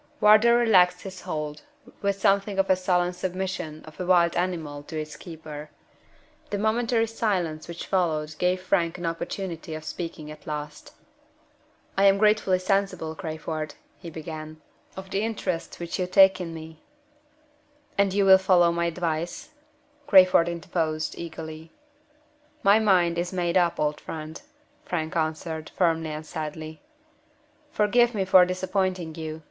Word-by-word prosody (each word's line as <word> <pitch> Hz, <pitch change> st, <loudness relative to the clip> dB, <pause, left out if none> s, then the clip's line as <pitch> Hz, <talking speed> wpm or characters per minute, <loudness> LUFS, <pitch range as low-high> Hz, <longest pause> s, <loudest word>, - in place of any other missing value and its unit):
Wardour 215 Hz, +3 st, +6 dB
relaxed 185 Hz, -7 st, +4 dB
his 190 Hz, -2 st, -8 dB
hold, 150 Hz, -4 st, -4 dB, 0.4 s
with 200 Hz, -1 st, 0 dB
something 195 Hz, +1 st, +2 dB
of 195 Hz, 0 st, +2 dB
the 190 Hz, -, +6 dB
sullen 180 Hz, -1 st, +1 dB
submission 180 Hz, -4 st, -4 dB
of 155 Hz, -1 st, -14 dB
a 180 Hz, -, -2 dB
wild 175 Hz, -2 st, +4 dB
animal 165 Hz, -5 st, -2 dB
to 155 Hz, +2 st, -6 dB
its 155 Hz, 0 st, -6 dB
keeper. 155 Hz, -3 st, -9 dB, 0.8 s
The 205 Hz, -, -2 dB
momentary 225 Hz, +2 st, +1 dB
silence 185 Hz, -9 st, -2 dB
which 170 Hz, 0 st, -7 dB
followed 160 Hz, -5 st, 0 dB
gave 180 Hz, +1 st, +1 dB
Frank 175 Hz, -3 st, +1 dB
an 175 Hz, -, -5 dB
opportunity 165 Hz, -1 st, -4 dB
of 155 Hz, -, -7 dB
speaking 155 Hz, -1 st, -6 dB
at 155 Hz, -, -13 dB
last. 150 Hz, -1 st, -6 dB, 1.0 s
"I 200 Hz, -, +5 dB
am 195 Hz, 0 st, +6 dB
gratefully 210 Hz, -3 st, +3 dB
sensible, 185 Hz, -4 st, -1 dB
Crayford," 155 Hz, -2 st, -5 dB, 0.2 s
he 170 Hz, -, -8 dB
began, 155 Hz, -1 st, -8 dB, 0.4 s
"of 190 Hz, 0 st, -8 dB
the 195 Hz, -, 0 dB
interest 195 Hz, -6 st, -3 dB
which 170 Hz, +1 st, -4 dB
you 180 Hz, -, 0 dB
take 190 Hz, 0 st, +6 dB
in 170 Hz, -2 st, -5 dB
me 160 Hz, -1 st, -10 dB, 0.6 s
" 295 Hz, -1 st, -36 dB
"And 200 Hz, -1 st, +4 dB
you 200 Hz, +1 st, +2 dB
will 190 Hz, 0 st, +8 dB
follow 180 Hz, -2 st, +4 dB
my 170 Hz, 0 st, 0 dB
advice?" 170 Hz, -, -3 dB, 0.6 s
Crayford 185 Hz, -5 st, +6 dB
interposed, 160 Hz, -2 st, -2 dB
eagerly. 160 Hz, -1 st, -8 dB, 0.9 s
"My 200 Hz, +2 st, +6 dB
mind 180 Hz, -5 st, +3 dB
is 175 Hz, +1 st, -2 dB
made 175 Hz, -2 st, -1 dB
up, 175 Hz, -2 st, +2 dB
old 150 Hz, 0 st, 0 dB
friend," 155 Hz, 0 st, -7 dB, 0.4 s
Frank 160 Hz, -1 st, -3 dB
answered, 160 Hz, 0 st, -2 dB
firmly 165 Hz, -3 st, +1 dB
and 155 Hz, 0 st, -6 dB
sadly. 155 Hz, -1 st, -6 dB, 0.9 s
"Forgive 240 Hz, +2 st, +3 dB
me 195 Hz, -2 st, 0 dB
for 185 Hz, -1 st, +7 dB
disappointing 185 Hz, -2 st, -2 dB
you. 160 Hz, -1 st, -6 dB
175 Hz, 145 wpm, -26 LUFS, 160-190 Hz, 1.0 s, will